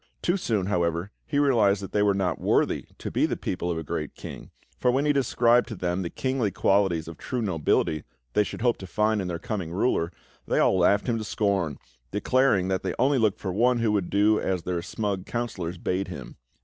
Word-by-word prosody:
Too 175 Hz, -, +2 dB
soon, 110 Hz, -, 0 dB
however, 85 Hz, 0 st, 0 dB, 0.2 s
he 145 Hz, -, -1 dB
realised 115 Hz, -9 st, +4 dB
that 95 Hz, -, -7 dB
they 105 Hz, -, +1 dB
were 100 Hz, -1 st, +3 dB
not 95 Hz, -2 st, -1 dB
worthy -, -, +1 dB
to -, -, -5 dB
be -, -, +2 dB
the -, -, -2 dB
people 90 Hz, -, -3 dB
of 85 Hz, -, -1 dB
a 80 Hz, -, -3 dB
great -, -, -4 dB
king, -, -, -9 dB, 0.3 s
for 125 Hz, -, +2 dB
when 135 Hz, +4 st, +2 dB
he 145 Hz, -, +3 dB
described 120 Hz, -3 st, +3 dB
to 110 Hz, -, -6 dB
them 90 Hz, 0 st, -1 dB
the 85 Hz, -, -3 dB
kingly 130 Hz, -2 st, -1 dB
qualities 95 Hz, -3 st, +1 dB
of 85 Hz, -1 st, -9 dB
true 125 Hz, -, -3 dB
nobility 80 Hz, -6 st, +1 dB, 0.3 s
they 105 Hz, -, +4 dB
should 105 Hz, -, -7 dB
hope 120 Hz, -2 st, +3 dB
to 95 Hz, -, -9 dB
find 105 Hz, +2 st, +1 dB
in 95 Hz, -, -3 dB
their 85 Hz, -1 st, -2 dB
coming 100 Hz, -5 st, -4 dB
ruler, 85 Hz, -3 st, +1 dB, 0.4 s
they -, -, +1 dB
all -, -, +4 dB
laughed 100 Hz, +3 st, +3 dB
him 115 Hz, -2 st, 0 dB
to -, -, -4 dB
scorn, 100 Hz, -8 st, 0 dB, 0.3 s
declaring 105 Hz, -3 st, +2 dB
that 95 Hz, 0 st, 0 dB
they 95 Hz, -, -3 dB
only 135 Hz, +2 st, +3 dB
looked 110 Hz, -3 st, +2 dB
for 95 Hz, -2 st, -3 dB
one 120 Hz, +5 st, +3 dB
who 115 Hz, -2 st, +1 dB
would 100 Hz, -4 st, 0 dB
do 105 Hz, +2 st, +3 dB
as 90 Hz, -3 st, -1 dB
their 90 Hz, -1 st, -2 dB
smug 100 Hz, 0 st, -3 dB
councillors 95 Hz, -8 st, -3 dB
bade 90 Hz, +3 st, -1 dB
him. -, -, -8 dB
100 Hz, 220 wpm, -26 LUFS, 90-115 Hz, 0.4 s, realised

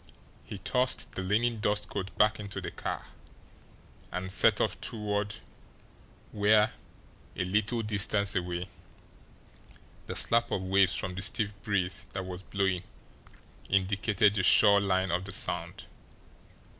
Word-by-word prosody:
He 105 Hz, -, -8 dB
tossed 125 Hz, +6 st, 0 dB
the -, -, -5 dB
linen 110 Hz, +4 st, 0 dB
dust 105 Hz, 0 st, 0 dB
coat 95 Hz, +1 st, -4 dB
back 105 Hz, 0 st, +3 dB
into 100 Hz, -1 st, -6 dB
the -, -, -6 dB
car, -, -, -5 dB, 1.1 s
and 95 Hz, +1 st, -4 dB
set -, -, +4 dB
off -, -, -1 dB
toward 105 Hz, -2 st, -2 dB, 1.0 s
where, 105 Hz, +1 st, +3 dB, 0.6 s
a 90 Hz, -, -2 dB
little 110 Hz, +5 st, 0 dB
distance 100 Hz, -1 st, 0 dB
away, 90 Hz, 0 st, -2 dB, 1.4 s
the -, -, -5 dB
slap 115 Hz, 0 st, +3 dB
of 95 Hz, -, -2 dB
waves 95 Hz, -1 st, +3 dB
from 90 Hz, -, -3 dB
the 95 Hz, -, -5 dB
stiff 105 Hz, +1 st, 0 dB
breeze 95 Hz, -5 st, -1 dB
that 95 Hz, -1 st, -4 dB
was 90 Hz, 0 st, -7 dB
blowing 95 Hz, -2 st, -1 dB, 0.9 s
indicated 100 Hz, +1 st, +2 dB
the 105 Hz, -, 0 dB
shore 100 Hz, +1 st, +6 dB
line 95 Hz, -2 st, 0 dB
of 90 Hz, +2 st, -1 dB
the 100 Hz, -, -7 dB
Sound. -, -, -1 dB
100 Hz, 130 wpm, -29 LUFS, 95-105 Hz, 1.4 s, shore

